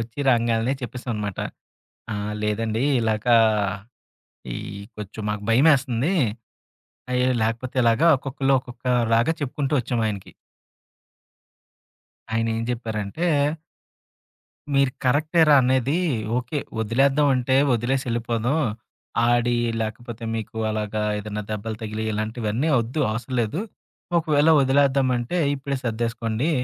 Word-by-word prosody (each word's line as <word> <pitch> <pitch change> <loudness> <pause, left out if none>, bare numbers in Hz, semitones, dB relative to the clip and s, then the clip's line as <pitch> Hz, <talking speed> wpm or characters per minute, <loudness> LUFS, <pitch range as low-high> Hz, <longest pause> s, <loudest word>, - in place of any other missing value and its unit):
ఒచ్చి 115 +4 -6
రాంగాలనే 115 +1 +2
చెప్పేసాం 125 0 -5
అనమాట. 105 -2 -4 0.7
"ఆ! - - -3 0.3
లేదండి, 110 +2 -1 0.2
ఇలాగా 110 +1 +2 1.2
ఈ - - -4 0.4
కొంచెం 105 +1 -7
మాకు 105 -1 -4
భయమేస్తుంది." 135 +3 +3 1.0
అయి 125 0 +2 0.2
లేకపోతే 115 +4 -2
ఇలాగా 115 +8 +4
ఒక్కొక్కళ్ళు 135 0 0
ఒక్కొక్క 125 0 -13 0.3
లాగా 115 +8 +3
చెప్పుకుంటూ 140 +1 -2
వచ్చాం 120 0 -2
ఆయనకి. 100 -3 -5 2.0
ఆయన 115 0 +1
ఏం - - -2
జెప్పారంటే 115 - -2 1.5
"మీరు 135 -1 +3
కరెక్టే 155 +6 +2
రా, 145 - +8
అనేది 130 +5 +2 0.4
ఓకే. 125 +4 -2 0.2
వదిలేద్దాం 135 +6 +3
అంటే 130 +1 +1 0.2
వదిలేసి 130 +3 0
ఎళ్ళిపోదాం. 120 +4 0 0.7
ఆడి 120 0 +2 0.3
లేకపోతే 115 +1 -6
మీకు 110 0 -5
అలాగా 105 0 -2 0.2
ఏదైనా 105 0 -5
దెబ్బలు 110 +1 -4
తగిలి, 110 0 -4
ఇలాంటివన్నీ 110 +5 -2
ఒద్దు, 120 +7 -4
అవసరం 125 +3 -4
లేదు. 115 - -2 0.6
ఒకవేళ 155 -1 +3
వదిలేద్దామంటే 135 +1 +2 0.2
ఇప్పుడే 135 0 -3
సర్దేసుకోండి. 115 +3 -1
120 Hz, 105 wpm, -23 LUFS, 110-135 Hz, 2.0 s, రా